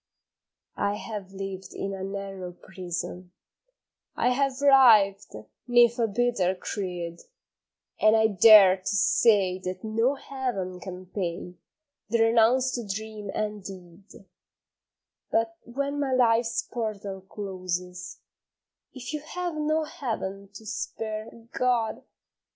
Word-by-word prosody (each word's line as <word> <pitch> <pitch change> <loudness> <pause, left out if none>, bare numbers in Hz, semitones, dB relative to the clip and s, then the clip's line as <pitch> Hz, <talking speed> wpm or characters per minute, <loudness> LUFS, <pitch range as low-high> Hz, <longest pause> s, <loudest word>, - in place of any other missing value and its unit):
I 200 0 0
have 210 -3 -7
lived 195 -1 -7
in 195 0 -3
a 190 -1 -6
narrow 195 -2 -6
prison, 180 0 -7 0.8
I - - +2
have 270 0 0
writhed 220 - +5 0.3
'neath 240 -1 +4
a 230 - +2
bitter 205 -4 +1
creed, 175 -3 -5 0.8
And 215 +1 +5
I 220 0 +4
dare 200 -2 +8
to 185 - -11
say 200 -3 +3
that 185 0 -6
no 225 +5 +1
heaven 240 -11 -4
can 185 0 -8
pay 180 -2 -4 0.6
The 235 - +2
renounced 240 +3 +3
dream 215 0 -6
and 210 -2 -3
deed, 190 +1 -12 1.0
But 225 0 0
when 280 +4 -3
my 275 -2 0
life's 235 -2 +2
portal 205 -4 -5
closes, 180 -2 -6 0.7
If 260 +3 -7
you 305 - -2
have 350 +3 -5
no 310 +1 0
heaven 200 -9 -5
to 220 +2 -12
spare 215 +1 -5 0.2
God! 245 -3 0
210 Hz, 115 wpm, -26 LUFS, 190-240 Hz, 1.0 s, dare